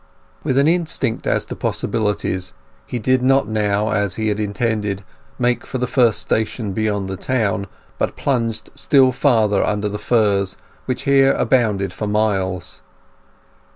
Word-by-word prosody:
With 135 -3 0
an 140 +2 +4
instinct 160 -8 0
as - - +1
to - - -6
possibilities, 100 -5 -2 0.3
he 125 - -3
did 130 +3 +2
not 135 -2 +3
now, 105 0 0
as 100 -4 0
he 110 -1 -1
had 105 0 -1
intended, 105 -1 -1 0.3
make 120 -1 +1
for 130 - -5
the 125 - 0
first 120 -3 +2
station 110 -2 -1
beyond 105 -2 -1
the 95 - -4
town, 105 -5 -1 0.3
but - - -1
plunged 115 -5 -1
still 135 -2 +4
farther 115 -6 +2
under 105 0 0
the 105 0 -4
firs, 100 -5 +1 0.3
which 130 - -3
here 135 0 +4
abounded 105 -7 +1
for 105 - -4
miles. 95 -4 -1
110 Hz, 150 wpm, -20 LUFS, 100-125 Hz, 0.3 s, an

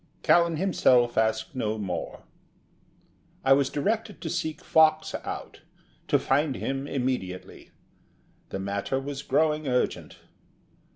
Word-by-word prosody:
Callan 170 -1 +4
himself 130 -9 +3
asked 110 +2 0
no 110 -3 -1
more. 90 -5 -5 1.2
I 135 - +7
was 140 0 +2
directed 215 +7 -2
to 160 - -4
seek 155 -1 -3
Fox 160 -1 +3
out - - -7 0.5
to - - +4
find 140 0 +1
him 135 +1 -3
immediately. 125 -10 -4 0.8
The - - -4
matter 100 +7 -2
was 140 0 -5
growing 155 -1 +1
urgent. 125 -1 -1
135 Hz, 115 wpm, -27 LUFS, 110-155 Hz, 1.2 s, I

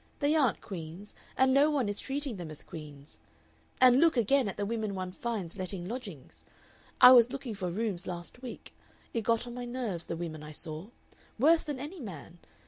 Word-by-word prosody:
They 290 +1 +2
aren't 270 -8 +2
queens, 175 +2 -8 0.2
and 260 0 +4
no 285 +3 +5
one 280 -7 +1
is 205 0 -2
treating 275 -4 -3
them 175 -3 -6
as 155 - -7
queens. 145 - -11 0.6
And 255 0 +7
look, 330 -3 +4
again, 245 +2 +3
at 195 - -5
the 205 - -1
women 215 -2 -2
one 185 -1 -4
finds 200 -3 -4
letting 185 -1 -3
lodgings.... 210 - -8 0.6
I 250 0 +11
was 245 -1 +7
looking 270 -4 -5
for 190 -3 -3
rooms 195 -1 -2
last 175 +6 -7
week. 250 -2 -9 0.4
It 230 - 0
got 230 +2 +1
on 240 - -7
my 245 0 -5
nerves 240 -8 -4
the 165 - -3
women 160 -3 -5
I 150 0 -9
saw. 155 +3 -5 0.5
Worse 320 +7 +5
than 295 -3 -4
any 300 +8 -7
man. 175 - -9
215 Hz, 195 wpm, -30 LUFS, 175-255 Hz, 0.6 s, I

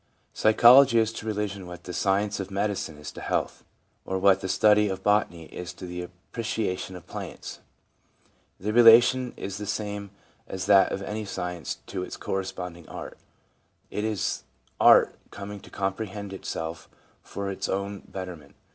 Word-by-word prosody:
Psychology 120 +3 +7
is 110 -1 +2
to 110 - -7
religion 100 -3 -3
what 90 0 -9
the 90 - -7
science 100 +3 +1
of 95 -1 -4
medicine 100 -5 -2
is 75 +1 -8
to - - -10
health, - - -2 0.4
or 95 - -2
what 95 0 +4
the 95 - -4
study 105 +2 +4
of 95 0 -4
botany 105 -5 +1
is 90 0 -6
to - - -9
the 90 0 -5
appreciation 95 +1 -4
of 90 - -10
plants. - - -7 1.0
The 105 +3 -2
relation 120 +2 +7
is 100 0 -5
the 105 - -5
same 100 -1 -3 0.4
as 95 -1 -4
that 100 -1 +5
of 100 - -3
any 105 +2 -4
science 90 -4 -4
to 95 - -5
its 90 - -6
corresponding 90 -3 -5
art. - - -8 0.7
It 105 - -2
is 110 -3 -1 0.4
art - - +7 0.2
coming 100 0 -8
to - - -15
comprehend 100 +1 -4
itself 80 -3 -5 0.3
for 100 -1 -5
its 95 - -4
own 100 +1 -2
betterment. 90 -6 -8
100 Hz, 155 wpm, -26 LUFS, 90-105 Hz, 1.0 s, Psychology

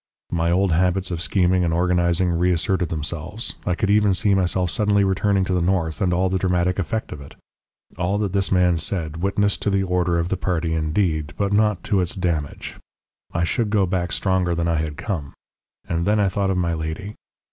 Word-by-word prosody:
"My 85 -1 0
old 95 +2 +2
habits 90 +2 +1
of 85 -1 -3
scheming 90 0 +2
and 85 - 0
organising 85 +1 +2
reasserted 90 +1 +1
themselves. 80 +7 -4
I 90 - +1
could 100 +1 0
even 105 -2 +4
see 100 +2 +2
myself 90 -2 +1
suddenly 105 0 +2
returning 95 0 +1
to 95 - -1
the 90 - +1
north, 85 -4 0
and 90 - +2
all 90 +2 +2
the 95 0 0
dramatic 90 0 0
effect 110 +4 -2
of 75 - -7
it. 70 - -12 0.6
All 90 +3 0
that 100 -3 -2
this 100 -1 0
man 90 -2 +3
said 80 -2 -2
witnessed 100 +3 0
to - - 0
the 100 -1 +1
disorder 90 -2 0
of 85 +1 -1
the 95 - -1
party 85 -3 -1
indeed, 80 -1 -1
but 100 0 0
not 105 -2 +2
to 100 -3 +1
its 90 - -1
damage. 85 -6 -3 0.5
I 85 - -1
should 110 +5 0
go 100 -2 +2
back 90 -1 -2
stronger 95 -3 0
than 85 0 -1
I 85 -1 +1
had 75 -1 -3
come. 80 -10 -4 0.5
And 85 +1 -1
then 105 +1 +3
I 100 -2 +3
thought 95 +1 -1
of 95 - 0
my 85 -2 0
lady. 80 +6 -5
90 Hz, 205 wpm, -22 LUFS, 85-95 Hz, 0.6 s, even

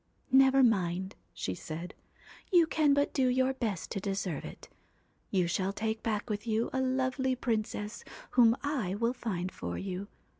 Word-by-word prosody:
' - - -42
Never 265 0 +6
mind,' 190 -4 +1 0.2
she 95 - -3
said, 165 - -6 0.3
' - - -22
you 345 -3 +6
can 305 -3 +3
but 285 0 +1
do 265 -2 +2
your 260 +1 +2
best 220 -9 -3
to - - -2
deserve 195 -5 -2
it. - - -10 0.6
You 185 -2 +2
shall 185 +3 0
take 220 +2 -2
back 215 -1 -2
with 210 0 -4
you 225 +1 0
a 260 - +1
lovely 260 0 0
princess 215 -2 -2 0.3
whom 235 -1 +5
I 255 -11 -1
will 230 +3 +1
find 185 -7 -3
for 85 0 -5
you. 190 +1 -4
220 Hz, 175 wpm, -31 LUFS, 190-260 Hz, 0.6 s, Never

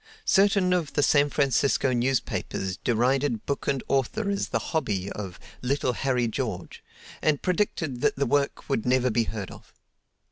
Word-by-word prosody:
Certain 195 -2 +4
of 165 -5 -1
the 145 - +2
San 145 0 +4
Francisco 140 -2 +2
newspapers 120 -6 -1
derided 125 +1 +1
book 140 - -3
and 135 -2 0
author 200 - 0
as 200 - -1
the - - 0 0.2
"hobby" 100 - -1
of 95 -4 -6 0.2
"little 125 0 0
Harry 125 -2 0
George," 110 -6 -4 0.4
and 150 -2 +1
predicted 165 -8 -1
that - - +2
the 140 - 0
work 145 -1 0
would 135 -6 0
never 125 0 +2
be 115 +1 +1
heard 105 -4 -5
of. - - -14
135 Hz, 155 wpm, -26 LUFS, 120-145 Hz, 0.4 s, Certain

